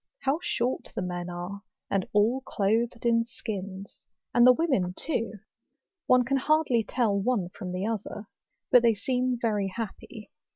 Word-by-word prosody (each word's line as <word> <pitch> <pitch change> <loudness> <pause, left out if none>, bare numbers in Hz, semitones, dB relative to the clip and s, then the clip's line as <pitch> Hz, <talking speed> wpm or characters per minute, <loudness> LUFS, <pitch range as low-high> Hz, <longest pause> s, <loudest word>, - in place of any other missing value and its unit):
How 275 +4 +1
short 245 +2 -1
the - - -2
men 175 -1 -4
are, 175 +3 -6 0.3
and 195 -2 0
all 220 +6 +3
clothed 230 +4 0
in 230 -1 +4
skins; 200 -4 -7 0.3
and 240 +1 +6
the - - +10
women 250 - +1
too! 230 -9 -2 0.7
one 255 -1 +5
can 275 +3 +1
hardly 270 -4 +2
tell 225 -2 +1
one 200 -3 0
from 180 -1 -7
the 185 +2 -2
other. 215 -1 -4 0.5
But 245 - +8
they 230 -2 +4
seem 250 +3 0
very 210 -4 0
happy. 220 +1 -7
225 Hz, 155 wpm, -28 LUFS, 195-250 Hz, 0.7 s, the